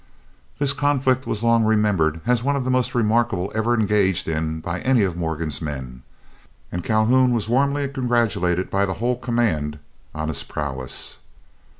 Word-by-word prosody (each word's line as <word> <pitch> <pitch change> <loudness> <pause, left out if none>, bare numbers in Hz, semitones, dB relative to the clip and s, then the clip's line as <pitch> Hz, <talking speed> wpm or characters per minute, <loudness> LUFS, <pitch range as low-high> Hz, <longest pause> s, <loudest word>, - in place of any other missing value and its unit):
This 140 -1 +3
conflict 135 -3 +1
was 110 0 -2
long 115 -1 +4
remembered 105 -8 +2
as 125 -1 +2
one 140 +3 0
of 140 - -1
the 130 - -1
most 130 -1 0
remarkable 110 -4 +1
ever 110 +2 +1
engaged 100 -4 +2
in 80 0 -2
by 85 +2 -4
any 125 -1 +3
of 90 -3 -1
Morgan's 80 -3 -3
men, 65 -5 -6 0.7
and 90 0 -4
Calhoun 120 +4 +3
was 110 -3 -1
warmly 140 +4 +1
congratulated 115 -9 0
by 100 0 +1
the 95 - -3
whole 125 +2 0
command 115 - -1 0.4
on 80 0 -3
his 70 -3 -1
prowess. 65 -3 -4
110 Hz, 160 wpm, -22 LUFS, 80-125 Hz, 0.7 s, long